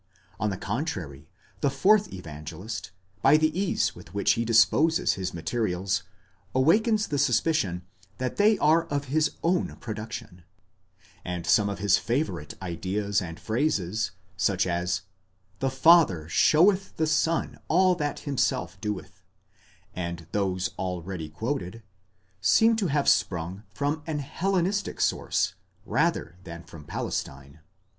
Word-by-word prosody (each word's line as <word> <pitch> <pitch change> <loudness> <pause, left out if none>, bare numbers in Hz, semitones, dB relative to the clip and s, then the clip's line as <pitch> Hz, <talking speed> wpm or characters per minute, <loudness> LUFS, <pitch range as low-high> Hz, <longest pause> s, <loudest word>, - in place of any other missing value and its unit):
On 105 - +1
the 95 - -3
contrary, 80 - -4 0.3
the 140 - +2
fourth 195 +10 +3
Evangelist, 90 +6 -7 0.3
by 140 +3 +6
the 155 0 +1
ease 190 0 0
with - - -14
which 100 - +3
he 115 - +1
disposes 115 +8 +4
his 95 -1 -3
materials, 95 0 -1 0.5
awakens 215 - +3
the 145 -2 -1
suspicion 125 - +1 0.3
that 130 -1 -3
they 210 +1 +5
are 160 +3 +3
of 145 0 -2
his 155 0 +2
own 175 +1 +1
production; 110 -4 -7 0.8
and 90 -1 -4
some 105 -2 +4
of 100 - -4
his 100 -1 +3
favourite 120 - -2
ideas 95 +4 -1
and 80 -3 -7
phrases, 110 - 0 0.3
such 95 -1 +1
as, 90 +2 -1 0.6
Zhe 135 - +2
Father 130 - +5
showeth 185 - +3
the 160 - +2
Son 160 +1 0
all 185 +2 +4
that 150 -4 -3
himself 100 - -1
doeth,' 105 -2 -5 0.7
and 85 -2 -5
those 95 -3 -1
already 90 -3 -4
quoted, 110 - -4 0.6
seem 225 - +5
to 205 -4 0
have 145 -1 0
sprung 90 +2 +1
from 145 +2 -2
an 155 -2 -2
Hellenistic 185 +6 -1
source, - - +1 0.3
rather 85 - 0
than 85 -1 -9
from 75 -3 -12
Palestine. 70 -2 -5
110 Hz, 130 wpm, -27 LUFS, -, 0.8 s, by